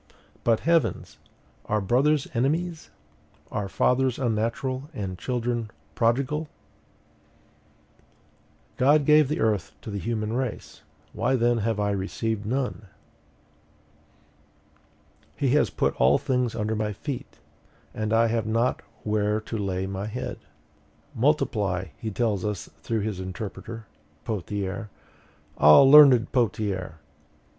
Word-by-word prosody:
But, 115 -2 +2
heavens! 165 -1 0 0.5
are 105 - 0
brothers 135 +8 +2
enemies? 155 +7 -1 0.6
Are 100 -2 -3
fathers 125 +4 +1
unnatural, 130 +3 -2
and 95 -4 -4
children 120 0 -2 0.2
prodigal? 140 +6 0 2.3
GOD 145 +3 +4
GAVE 150 -1 +6
THE 150 - -2
EARTH 105 -8 0
TO 110 - -8
THE 100 - -3
HUMAN 110 +1 -2
RACE: 125 -2 -4 0.3
why 120 +5 +1
then 120 -1 +2
have 110 0 -1
I 105 0 +1
received 105 +2 -3
none? 125 -4 -2 2.5
HE 135 - 0
HAS 145 +4 +3
PUT - - 0
ALL 65 +3 +4
THINGS 125 -3 -1
UNDER 110 0 -1
MY 105 -1 -2
FEET, 135 +5 -6 0.6
and 110 0 -3
I 115 +1 +4
have 115 -1 -1
not 115 +3 0 0.2
where 105 0 0
to 110 - -7
lay 95 -3 -2
my 95 +1 -4
head! 125 +4 -5 0.7
MULTIPLY, 105 - 0
he 110 - -4
tells 105 -3 -1
us 105 -8 -4
through 110 +6 -2
his 105 -2 -3
interpreter, 110 +4 -7 0.4
Pothier. 100 +1 -4 0.7
Ah, 75 - +8
learned 135 -4 +8
Pothier! 100 - -1
115 Hz, 115 wpm, -25 LUFS, 105-130 Hz, 2.5 s, Ah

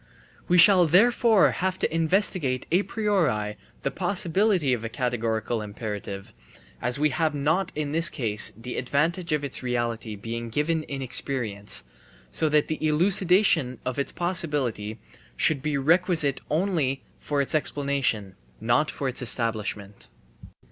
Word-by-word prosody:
We 180 - +3
shall 180 0 +7
therefore 220 +4 +4
have 185 0 -2
to - - -2
investigate 165 -5 0
a 180 +3 +4
priori 175 - -1 0.3
the 140 - -1
possibility 180 -3 +1
of 115 -2 -3
a 115 - -4
categorical 115 -2 -2
imperative, 105 -2 -7 0.5
as 125 +2 -1
we 150 +1 +1
have 155 +2 0
not 160 +6 0
in 150 -1 -3
this 165 +2 +6
case 110 -6 +1
the 125 +2 -7
advantage 165 +7 -1
of 150 -1 0
its 140 - -1
reality 120 -3 -3
being 115 +3 -6
given 155 +6 0
in 135 -1 -5
experience, 115 -5 -1 0.5
so 155 - +2
that 150 0 +2
[the 155 0 -4
elucidation 175 - +2
of] 130 +2 -3
its 140 - -1
possibility 145 - -1 0.4
should 150 -4 +2
be 150 0 -1
requisite 160 -1 +2
only 155 -6 -1 0.2
for 145 -1 -2
its 140 - -1
explanation, 140 -9 0 0.3
not 120 +7 +1
for 140 - -4
its 130 +1 -3
establishment. 110 -4 -2
140 Hz, 140 wpm, -25 LUFS, 120-170 Hz, 0.5 s, shall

